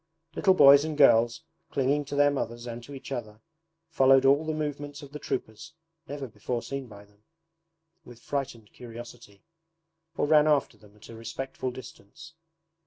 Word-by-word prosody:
Little 190 -2 +3
boys 140 -2 +8
and 155 -1 -4
girls, 120 -4 +4 0.3
clinging 140 +2 0
to 140 +1 -6
their 145 0 +4
mothers 120 -3 -4
and 120 0 -7
to 140 - -10
each 135 - -10
other, 110 -5 -6 0.5
followed 135 -2 +5
all 145 +4 +4
the - - 0
movements 145 -1 -5
of 140 - -12
the 150 - -8
troopers 115 +3 -5 0.3
(never 140 -1 -6
before 120 +1 -5
seen 140 -2 -6
by 100 -2 -13
them) 105 +1 -30 0.8
with 120 -5 -14
frightened 120 -5 -5
curiosity, 120 -3 -12 0.7
or - - +1
ran 150 0 +5
after 150 -3 +1
them 105 -1 -21
at 105 - -16
a 115 - -10
respectful 130 +3 -5
distance. 130 - -12
135 Hz, 165 wpm, -27 LUFS, 115-145 Hz, 0.8 s, boys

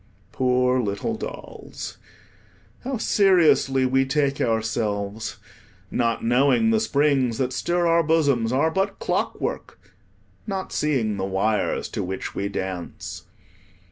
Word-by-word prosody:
Poor 125 +1 +2
little 105 - -2
dolls, - - -8 0.8
how 260 0 -2
seriously 175 - +3
we 135 +1 +3
take 140 0 0
ourselves, 110 -2 -1 0.5
not 115 -1 0
knowing 140 - +3
the 220 - +3
springs 140 - +1
that 130 -1 -1
stir 175 +6 0
our 170 0 +4
bosoms 145 -8 +2
are 145 +5 +2
but 190 +3 -1
clockwork, - - -3 0.7
not 195 -2 -4
seeing 125 -9 0
the 95 - -3
wires 100 +3 0
to - - -3
which 95 +1 -5
we 100 +1 -2
dance. 95 -3 -6
130 Hz, 115 wpm, -24 LUFS, 110-160 Hz, 0.8 s, our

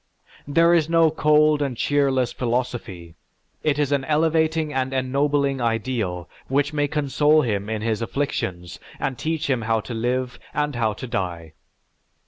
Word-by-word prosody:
This 165 +2 +4
is - - -14
no 165 -1 +4
cold 150 -1 +3
and 135 -4 -2
cheerless 135 -3 +1
philosophy; 120 -9 -3 0.5
it 150 -2 +1
is 145 -2 0
an 140 -2 +1
elevating 160 0 +1
and 130 0 -1
ennobling 140 +1 0
ideal 115 -7 -2 0.2
which 140 +2 0
may 145 -1 +1
console 150 +1 +2
him 105 -3 -2
in 110 -1 -3
his 110 -1 -1
afflictions 95 -9 -3 0.2
and 135 - -2
teach 160 +3 -2
him 130 -4 0
how 115 +1 +1
to 120 - -7
live 125 +2 -2 0.2
and 150 -1 -1
how 110 -2 0
to 130 - -7
die. 85 -8 -4
135 Hz, 150 wpm, -23 LUFS, 115-150 Hz, 0.5 s, This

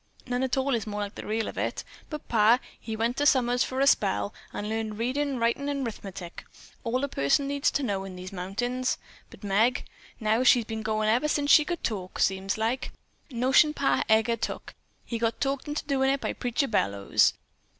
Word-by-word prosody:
None 245 0 -1
at 265 0 0
all 265 +1 +1
is 225 -3 -1
more 210 0 -3
like 205 0 -4
the - - -8
real 220 +1 -1
of - - -5
it. - - -2 0.3
But 300 -2 -7
pa, 225 +1 +5 0.2
he 220 - -5
went 230 +4 -1
summers 245 -2 +3
for 260 - -3
a 275 - +4
spell, 100 - +2 0.2
and 205 - -4
learned 220 -1 -3
readin', 265 +4 -1
writin' 235 +5 0
and 280 -2 -2
'rithmetic. 195 -6 -7 0.4
All 255 +2 -1
a - - +1
person 200 - +1
needs 280 0 +1
to 285 - -1
know 200 -5 -1
in 190 -1 -8
these 185 +1 -8
mountains; 245 +8 -2 0.3
but - - -15
Meg, 215 +6 +2 0.3
now, 220 +1 +2
she's 245 -2 +5
been 220 0 -4
goin' 215 0 0
ever 240 +7 +3
since 290 -1 +1
she 305 - +8
could 345 +2 -4
talk, 190 -5 -3
seems 195 +1 0
like. 230 +4 -1 0.4
Notion 265 +4 +3
Pa 275 - +2
Heger 220 +1 +3
took. - - -5 0.3
He 230 - -4
got 230 0 0
talked 275 +1 -1
into 295 +1 -3
doin' 270 -2 +1
it 275 +1 +1
by - - -2
Preacher 250 +3 -1
Bellows." 100 - +2
235 Hz, 200 wpm, -27 LUFS, 215-265 Hz, 0.4 s, she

